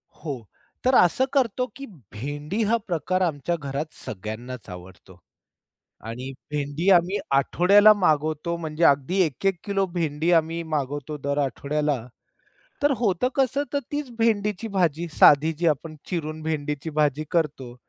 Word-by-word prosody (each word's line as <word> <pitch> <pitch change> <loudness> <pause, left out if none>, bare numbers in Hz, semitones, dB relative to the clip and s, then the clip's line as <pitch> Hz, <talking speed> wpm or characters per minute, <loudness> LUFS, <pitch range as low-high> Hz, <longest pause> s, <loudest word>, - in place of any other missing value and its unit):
हो. 140 -7 -6 0.4
तर 255 +1 +4
असं 180 +8 +4
करतो 250 -2 +1
की 275 - -8 0.3
भेंडी 145 - -3
हा 230 - +4
प्रकार 185 +2 -1
आमच्या 170 -1 0
घरात 150 0 -5
सगळ्यांनाच 110 +4 -7
आवडतो. 90 0 -12 0.9
आणि 125 +4 -6 0.2
भेंडी 150 +5 -1
आम्ही 180 +2 +4 0.2
आठवड्याला 200 +9 +6
मागवतो 155 -3 0
म्हणजे 160 0 -3
अगदी 140 +7 +3
1-1 185 +6 -1
किलो 200 -2 +1
भेंडी 165 -1 0
आम्ही 165 +1 -4
मागवतो 145 +1 -3
दर 140 +1 -1
आठवड्याला. 145 +1 -1 0.9
तर 290 - +4
होतं 210 0 +1
कसं 275 +1 +1
तर 285 - +2
तीच 290 -2 -3
भेंडीची 215 -2 0
भाजी 175 -5 0
साधी 150 +2 +6
जी 170 +1 +1
आपण 155 +1 -1
चिरून 155 -2 -3
भेंडीची 150 -1 -3
भाजी 150 -1 +1
करतो. 140 -7 -1
155 Hz, 135 wpm, -24 LUFS, 145-190 Hz, 0.9 s, आठवड्याला